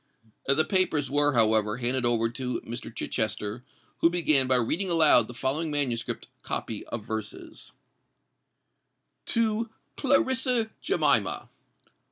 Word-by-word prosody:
The 140 +3 +3
papers 160 -8 +1
were, 145 0 +3
however, 110 -2 +2
handed 125 0 0
over 115 -1 +2
to 125 +2 -4
Mr. 120 0 -7
Chichester, 110 0 -3 0.4
who 165 - +5
began 155 -6 +2
by 130 - +3
reading 155 - 0
aloud 165 -3 +5
the 120 - -9
following 145 +6 -1
manuscript 135 -6 -2
copy - - -4
of 110 -3 -6
verses:— 110 -1 -7 1.6
TO 225 0 0 0.3
CLARISSA 260 -4 +2
JEMIMA. - - +1
135 Hz, 115 wpm, -27 LUFS, 120-170 Hz, 1.6 s, who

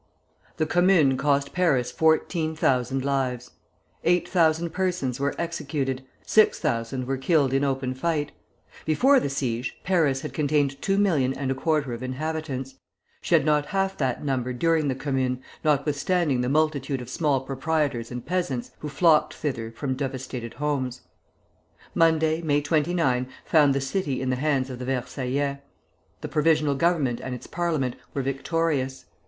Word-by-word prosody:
The 155 - +1
Commune 175 -5 +4
cost 140 +1 +1
Paris 135 -9 +2
fourteen 160 +2 +1
thousand 130 -2 +1
lives. 130 -3 -1 0.5
Eight 175 0 +2
thousand 165 -1 +2
persons 175 -9 -1
were 140 +1 0
executed; 140 -5 -2 0.2
six 215 -1 +4
thousand 115 +3 -2
were 135 +1 -1
killed 135 -1 +2
in 135 +1 +2
open 135 -2 -1
fight. 150 +2 -1 0.5
Before 260 - +4
the 140 - -2
siege 125 -3 -2
Paris 155 -8 +2
had - - -6
contained 145 -2 0
two 195 0 +1
million 150 -10 +2
and 135 -1 -2
a - - +2
quarter 145 -2 0
of 115 - -6
inhabitants: 135 0 -4 0.5
she - - +2
had - - +3
not 150 -1 +2
half 195 -1 0
that 130 0 -1
number 130 -2 -1
during 160 +3 +1
the 130 - 0
Commune, 130 -2 -1 0.2
notwithstanding 150 0 +1
the 125 - -1
multitude 145 -2 +1
of 125 - -8
small 145 -5 +1
proprietors 135 -3 -1
and 125 -1 -6
peasants 160 -9 -2
who 150 - -5
had 140 - -10
flocked 165 -4 +4
thither 115 -6 -3
from 130 +3 -3
devastated 130 -3 -5
homes. 135 -4 -2 0.9
Monday, 160 0 +3
May 145 -3 +1
29, 145 -4 +1 0.2
found 145 -4 +4
the - - +1
city 135 -1 -2
in 130 0 -1
the - - +1
hands 135 -2 0
of 125 - -7
the 125 - -5
Versaillais. 135 +2 -2 0.6
The - - -4
Provisional 155 -1 +2
Government 140 -5 +1
and 130 -1 -4
its 125 - -10
Parliament 160 -8 -1 0.2
were 135 - -1
victorious. 135 0 -1
140 Hz, 155 wpm, -25 LUFS, 130-160 Hz, 0.9 s, Commune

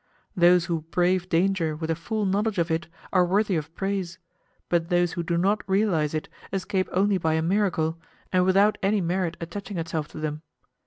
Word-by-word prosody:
Those 175 -1 +5
who 170 -2 -1
brave 180 +1 +1
danger 170 -2 +1
with 160 +1 -3
a - - +1
full 210 +6 -2
knowledge 205 +2 0
of 170 -1 0
it 160 +1 -1 0.3
are 185 -2 +5
worthy 195 +2 +1
of 155 -1 -3
praise, 195 -2 -2 0.5
but 170 -1 0
those 175 -1 +2
who 170 - -3
do 170 0 -1
not 200 +4 +2
realize 185 -7 +1
it 155 - -3 0.2
escape 190 0 -1
only 195 +1 +2
by 160 -1 +1
a 160 - 0
miracle, 170 -3 0 0.3
and 185 0 +4
without 195 +3 +3
any 200 +2 +2
merit 175 -1 -1
attaching 200 +3 -6
itself 165 -2 -3
to - - -12
them. 155 -1 -3
175 Hz, 190 wpm, -25 LUFS, 165-195 Hz, 0.5 s, Those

